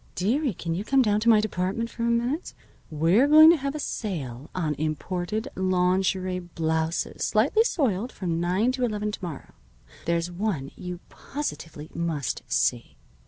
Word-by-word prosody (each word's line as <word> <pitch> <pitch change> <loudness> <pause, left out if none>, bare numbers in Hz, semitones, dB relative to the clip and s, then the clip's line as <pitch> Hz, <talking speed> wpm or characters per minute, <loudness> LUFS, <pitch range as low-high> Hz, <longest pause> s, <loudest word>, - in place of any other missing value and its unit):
"Dearie, 235 - 0
can 165 0 -3
you 185 +4 -2
come 270 +3 +3
down 210 -2 +2
to 230 +2 +2
my 220 -2 +7
department 210 +2 -2
for - - -8
a 235 - +1
minute? 240 +8 -1 0.3
We're 165 - +3
going 310 +2 +9
to 340 - +3
have 275 0 -3
a - - -3
sale 145 - -4
on 160 -5 0
imported 175 - -2
lawnjerie 185 0 +1
blouses, 160 -1 -2
slightly 265 - +3
soiled, 250 - 0
from 170 -4 -2
nine 185 +8 +2
to 255 -1 -3
eleven 210 -3 -1
to 210 - -8
morrow. 165 -6 -7 0.5
There's 170 +1 0
one 175 -7 -2
you 180 -1 -7
positively 165 - -6
must 165 -6 -2
see. - - 0
190 Hz, 160 wpm, -26 LUFS, 170-235 Hz, 0.5 s, going